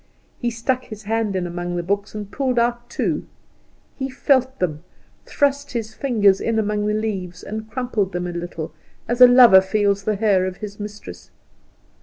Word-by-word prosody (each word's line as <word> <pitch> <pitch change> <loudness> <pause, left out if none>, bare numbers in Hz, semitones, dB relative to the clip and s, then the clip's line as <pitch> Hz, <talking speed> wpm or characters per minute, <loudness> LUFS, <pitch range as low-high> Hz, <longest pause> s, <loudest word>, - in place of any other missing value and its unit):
He 240 - 0
stuck 250 +2 -2
his 215 -3 -10
hand 220 -1 -1
in 185 -1 -1
among 175 0 -4
the 175 - -2
books, 200 +3 -2
and 205 -1 -6
pulled 260 -1 -1
out 240 +1 0
two. - - -2 0.7
He 265 -1 -4
felt 260 -1 +1
them, 155 -3 -2 0.4
thrust 285 0 0
his 220 -2 -4
fingers 210 -7 +2
in 230 -1 0
among 210 -1 0
the 210 - +1
leaves, 190 -5 -4
and 220 +1 -6
crumpled 225 -5 -2
them 180 -1 -3
a 175 - -3
little, 170 -2 -6 0.3
as 240 +2 -1
a 250 - +12
lover 245 -6 +8
feels 200 0 0
the 215 +1 0
hair 195 -3 +2
of 185 0 -6
his 205 -1 -8
mistress. 205 - -9
210 Hz, 180 wpm, -21 LUFS, 190-240 Hz, 0.7 s, a